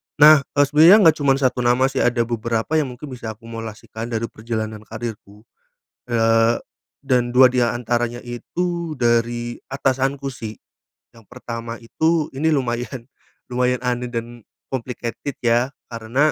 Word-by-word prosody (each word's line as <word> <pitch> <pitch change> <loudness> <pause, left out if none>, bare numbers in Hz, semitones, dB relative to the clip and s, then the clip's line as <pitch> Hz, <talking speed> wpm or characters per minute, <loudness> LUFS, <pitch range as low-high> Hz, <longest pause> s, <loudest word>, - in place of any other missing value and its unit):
Nah, 150 +1 +8 0.2
eee, 145 - +5
sebenarnya 155 +6 +7
enggak 160 -3 +6
cuman 140 -2 +3
1 130 -2 0
nama 120 +1 +3
sih, 135 - -2
ada 120 -1 +2
beberapa 115 +5 -1
yang 150 - 0
mungkin 140 +3 -9
bisa 115 -3 -6
akumulasikan 115 0 -8
dari 115 -1 -3
perjalanan 110 -1 -4
karierku, 110 -2 -8 0.6
eee, 115 0 +2 0.4
dan 125 -3 +1
2 130 0 +7
di 125 - +1
antaranya 120 0 -1
itu, 170 +7 -3
dari 120 -1 0
atasanku 135 +1 -1
sih. 110 -3 -7 0.5
Yang 115 -2 -19
pertama 115 0 -7
itu, 160 +6 0
ini 160 +3 +2
lumayan 125 -1 -3 0.4
lumayan 125 0 +1
aneh 125 0 -1
dan 120 0 -5 0.3
complicated 125 +1 -4
ya, 120 +2 +3 0.2
karena, 120 +7 +1
120 Hz, 135 wpm, -21 LUFS, 115-135 Hz, 0.6 s, Nah